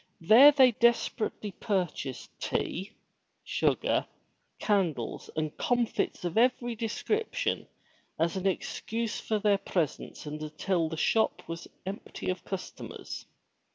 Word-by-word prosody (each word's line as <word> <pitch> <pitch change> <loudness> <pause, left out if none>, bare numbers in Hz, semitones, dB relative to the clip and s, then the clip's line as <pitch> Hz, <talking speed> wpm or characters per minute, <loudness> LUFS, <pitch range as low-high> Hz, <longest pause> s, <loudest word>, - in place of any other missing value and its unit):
There 230 - +9
they 265 -3 +6
desperately 230 -2 +1
purchased 180 - -2
tea, 195 +5 -2 0.5
sugar, - - +1 0.5
candles 175 - 0
and 155 -1 -2
comfits 240 -6 0
of 175 +5 +1
every 240 0 +2
description, 430 - -1 0.5
as 165 +2 +1
an 190 0 0
ex 190 - -2
cuse 230 0 -2
for 215 - 0
their 205 -1 +3
presence 165 -4 -2
until 155 +3 -1
the 160 - -5
shop 220 +7 +1
was 165 0 -6 0.2
empty 190 -1 -4
of 185 - -6
customers. 190 -2 -6
200 Hz, 115 wpm, -29 LUFS, 165-230 Hz, 0.5 s, There